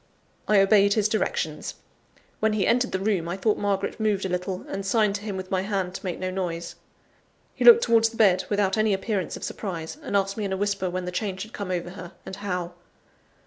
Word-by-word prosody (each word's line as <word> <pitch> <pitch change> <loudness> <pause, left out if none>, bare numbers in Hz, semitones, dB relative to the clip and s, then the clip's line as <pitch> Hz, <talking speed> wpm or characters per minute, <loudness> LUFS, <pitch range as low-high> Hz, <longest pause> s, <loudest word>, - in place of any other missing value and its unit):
I 210 -2 +5
obeyed 200 0 +5
his 215 -2 +3
directions. 350 - -2 0.6
When 220 0 +2
he 205 -3 +1
entered 250 +1 +2
the - - 0
room, 190 -4 0
I 180 - -3
thought 210 +2 +1
Margaret 200 +2 -1
moved 210 -3 +1
a - - -2
little, 180 +1 -3
and 195 - -4
signed 210 +1 +2
to - - -12
him 205 -2 -4
with 185 0 -7
my 190 -1 +1
hand 190 -2 -2
to - - -7
make 180 -3 -3
no 185 0 -3
noise. 175 -3 -3 0.8
He - - -3
looked 470 -1 +9
towards 225 -1 +4
the 225 - -12
bed 190 -4 +4
without 205 0 +1
any 215 -2 +3
appearance 195 -1 -2
of - - -10
surprise, 175 - -5
and 205 - 0
asked 195 +1 -1
me 215 - -2
in 195 - -2
a - - -1
whisper 200 -2 -1
when 180 0 -3
the 180 - -3
change 190 0 -3
had 220 - -12
come 200 -2 -5
over 175 -1 -2
her, 185 -1 -9
and 190 - -7
how. 180 -4 -3
195 Hz, 225 wpm, -25 LUFS, 185-215 Hz, 0.8 s, looked